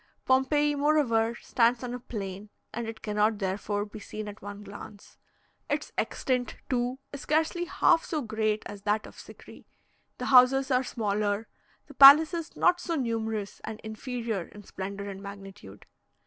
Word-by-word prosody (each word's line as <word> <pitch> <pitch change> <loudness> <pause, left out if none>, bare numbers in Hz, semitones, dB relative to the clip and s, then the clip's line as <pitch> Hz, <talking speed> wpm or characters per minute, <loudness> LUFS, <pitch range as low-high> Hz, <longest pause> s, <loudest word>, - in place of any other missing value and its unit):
Pompeii, 290 +3 +3
moreover, 280 -6 +2
stands 235 +1 +1
on 245 -1 -4
a 250 - -5
plain, 200 -3 -7 0.2
and 235 0 -4
it 225 0 -8
cannot, 210 0 +1
therefore, 205 +1 -2
be 215 +1 -10
seen 215 +1 -7
at 205 0 -9
one 205 +1 -8
glance; 205 0 -12 0.5
its - - -2
extent, 250 -2 -1 0.2
too, 250 +1 0 0.2
is 280 - -6
scarcely 320 +4 0
half 330 - +3
so 315 - -3
great 215 -1 -1
as 205 -1 -8
that 210 +1 0
of - - -13
Sikri; - - -14 0.5
the - - -4
houses 265 +1 +5
are 255 0 +4
smaller, 210 -2 -1 0.4
the 290 - -14
palaces 310 +5 +7
not 355 0 +3
so 335 - -2
numerous, 225 -6 -3
and 220 - -6
inferior 220 -3 -4
in 210 - -13
splendour 200 +1 -6
and 195 -1 -7
magnitude. 195 - -11
225 Hz, 155 wpm, -28 LUFS, 205-265 Hz, 0.5 s, palaces